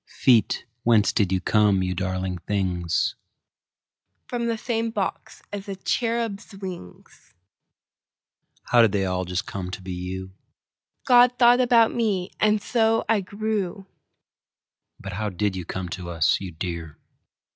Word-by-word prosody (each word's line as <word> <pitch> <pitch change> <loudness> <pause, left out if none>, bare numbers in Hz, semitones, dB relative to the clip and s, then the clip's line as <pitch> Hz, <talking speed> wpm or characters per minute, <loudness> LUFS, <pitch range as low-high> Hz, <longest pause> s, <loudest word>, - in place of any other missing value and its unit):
Feet, 120 -4 +2 0.2
whence 115 -3 +3
did 100 -5 +1
you 95 - +2
come, 100 -1 +3
you 90 0 -1
darling 95 0 -3
things? 90 -4 -1 1.1
From 240 -1 -2
the 230 -1 -1
same 230 -1 -1
box 205 -4 -4
as 200 -1 -5
the 195 - -4
cherubs' 225 0 -2
wings. 185 - -10 1.3
How 120 - +4
did 110 -3 +4
they 100 -1 +1
all 90 0 -1
just 90 +1 -3
come 95 -2 -5
to 95 - -6
be 95 0 -5
you? 95 +1 -5 0.7
God 245 0 +6
thought 240 +1 +6
about 235 -2 +4
me, 205 -6 -1
and 215 0 +3
so 225 0 +1
I 220 -3 +2
grew. 200 -1 -3 1.1
But 100 -1 -7
how 105 +2 -2
did 100 +1 -1
you 90 -2 -5
come 90 +1 -4
to 85 0 -6
us, 80 +1 +2
you 95 -2 -6
dear? 80 -2 -6
110 Hz, 145 wpm, -24 LUFS, -, 1.3 s, God